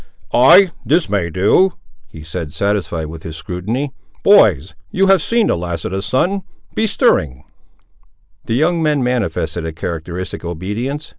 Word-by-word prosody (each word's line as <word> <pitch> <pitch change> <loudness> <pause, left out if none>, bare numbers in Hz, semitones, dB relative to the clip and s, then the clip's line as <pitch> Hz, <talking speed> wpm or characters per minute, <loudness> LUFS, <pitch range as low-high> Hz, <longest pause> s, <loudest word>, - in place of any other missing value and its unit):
"Ay, 165 +10 +6
this 155 +8 +2
may 95 -4 -1
do," 105 - +3 0.3
he 80 - -12
said, 80 -1 -6
satisfied 90 -4 -1
with 80 +1 -9
his 80 -1 -8
scrutiny; 110 - -4 0.3
"boys, 95 - +5 0.2
you 195 +1 +1
have 195 -3 +4
seen 230 +6 +1
the - - +1
last 85 0 -4
of - - -3
the 95 +1 -2
sun; 175 - 0 0.3
be 220 - +1
stirring." 75 - +1 1.0
The 115 - 0
young 165 +5 +1
men 150 -4 +1
manifested 90 -9 -2
a 80 - -3
characteristic 85 +3 -5
obedience. 105 - -4
100 Hz, 150 wpm, -17 LUFS, -, 1.0 s, Ay